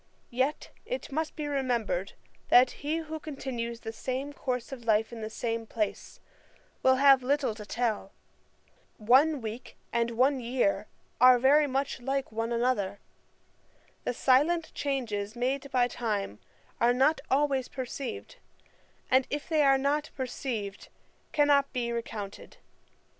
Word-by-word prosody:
Yet 260 +5 -1
it - - -5
must 315 +3 -2
be 300 - -4
remembered, 240 -9 -1 0.4
that 250 +1 +7
he 300 +3 -1
who 315 -1 -5
continues 240 -6 -5
the 225 - -6
same 260 +5 -4
course 250 -1 -3
of 255 -3 -7
life 220 +1 +2
in 230 - -7
the 215 - -4
same 225 0 -3
place, 215 -2 -3 0.6
will 260 0 +5
have 270 0 +6
little 275 -2 +1
to 210 -1 -10
tell. 220 -5 -1 0.9
One 265 +7 +4
week 225 +2 -7 0.2
and 235 0 +1
one 260 +4 +2
year 250 +4 0 0.3
are 255 0 +8
very 285 +4 +5
like 270 -1 -2
one 225 +1 -2
another. 235 -5 0 1.1
The 245 - -2
silent 310 +7 +3
changes 225 -7 -2
made 265 +3 -1
by 250 -2 +3
time 210 - -3 0.4
are 240 +1 +4
not 275 +3 +3
always 270 -2 +2
perceived; 275 - -6 0.7
and 260 0 +4
if 290 0 -4
they 315 -2 +2
are 275 -1 +5
not 290 +3 0
perceived, 240 -6 -4 0.4
cannot 285 -2 +3
be 240 -2 -1
recounted. 220 -4 -6
255 Hz, 135 wpm, -29 LUFS, 230-280 Hz, 1.1 s, are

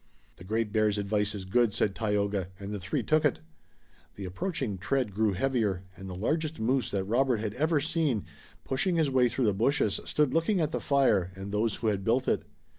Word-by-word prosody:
"The - - -12
Great 110 +2 -1
Bear's 105 -1 +2
advice 105 +1 0
is 95 -2 -6
good," 110 +2 +2
said 105 -3 +1
Tayoga, 100 -3 0
and 100 0 -6
the 105 - -3
three 95 +1 -2
took 155 0 +2
it. 145 - +2 0.8
The 100 - -6
approaching 125 - -3
tread 120 +2 -1
grew 105 0 +1
heavier, 105 -4 0
and 95 +1 -9
the 90 - -6
largest 155 - -1
moose 125 +1 +1
that 100 -1 -1
Robert 120 +4 +2
had 105 -1 -3
ever 155 +4 +1
seen, 155 - 0 0.4
pushing 170 +7 0
his 155 -4 +2
way 125 -2 +4
through 130 +1 0
the 105 - +3
bushes, 110 0 +1
stood 150 -3 +1
looking 165 +5 +2
at 155 -2 0
the - - -2
fire, 115 - +2
and 95 +1 -7
those 105 +1 +1
who 115 - -3
had 100 -2 -1
built 120 +5 +1
it. - - +2
110 Hz, 205 wpm, -29 LUFS, 100-135 Hz, 0.8 s, way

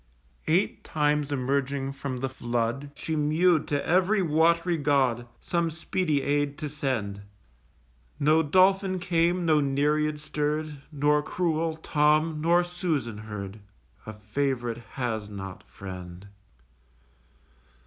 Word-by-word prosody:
Eight 175 +6 +1
times 150 -1 0
emerging 135 0 -1
from 135 -2 -5
the 135 - 0
flood 120 +2 -2
She 160 - -3
mew'd 155 +2 +3
to 145 -1 -1
ev'ry 190 +3 +3
wat'ry 170 +2 +3
god, 135 -5 +1
Some 170 -1 0
speedy 160 -2 -1
aid 145 0 0
to 150 - -4
send. 120 -9 -2 1.0
No 155 +3 +4
Dolphin 185 +4 +3
came, 175 0 +1
no 155 -2 +4
Nereid 150 +2 +1
stirr'd: 150 -1 -2
Nor 150 0 +2
cruel 165 -1 -1
Tom, 155 0 +2
nor 170 +2 +4
Susan 165 - -2
heard. 105 -1 -7 0.5
A 110 - -5
Fav'rite 120 +2 -2
has 110 -5 -2
not 95 -2 -7
friend! 90 0 -9
150 Hz, 115 wpm, -27 LUFS, 130-160 Hz, 1.0 s, No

